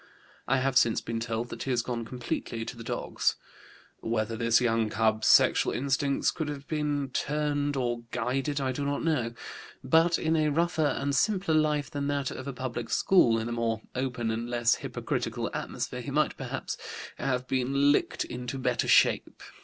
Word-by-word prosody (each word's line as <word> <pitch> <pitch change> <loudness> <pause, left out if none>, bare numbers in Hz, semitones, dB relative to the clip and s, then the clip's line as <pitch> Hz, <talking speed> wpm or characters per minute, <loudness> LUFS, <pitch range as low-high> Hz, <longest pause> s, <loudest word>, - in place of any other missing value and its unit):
I 135 - +3
have 130 0 +1
since 115 -3 +4
been 115 0 -4
told 115 +1 -3
that - - -7
he - - -3
has 120 -2 +1
gone 115 -2 -3
completely 120 -1 -4
to - - -6
the 115 - -9
dogs. - - -1 0.6
Whether 115 0 -1
this 115 0 +3
young 115 -2 +1
cub's 110 0 +1
sexual - - +5
instincts 140 +1 +1
could 160 - -4
have 145 -1 -7
been 145 -3 -1
turned 145 0 -1
or 120 -2 -1
guided 135 +6 -1
I 135 -1 0
do 140 +3 -3
not 140 0 -1
know; 125 -8 0 0.5
but 165 +5 +4
in 160 0 +1
a 155 -1 +2
rougher 160 0 +1
and 140 0 -1
simpler 185 - +1
life 150 -3 +1
than 140 -1 -2
that 140 -2 -1
of 130 - -7
a - - -2
public 125 -2 -5
school, 125 -12 +4
in 110 0 -2
a - - -4
more 115 -2 -1
open 125 -3 -2
and 115 +2 -3
less 120 -1 +3
hypocritical - - -3
atmosphere, - - -4
he - - -6
might, - - +1
perhaps, - - -5 0.4
have 130 -1 -1
been 135 +2 +2
licked - - 0
into 125 +2 -5
better 125 -2 0
shape. - - +3
130 Hz, 180 wpm, -28 LUFS, 115-145 Hz, 0.6 s, sexual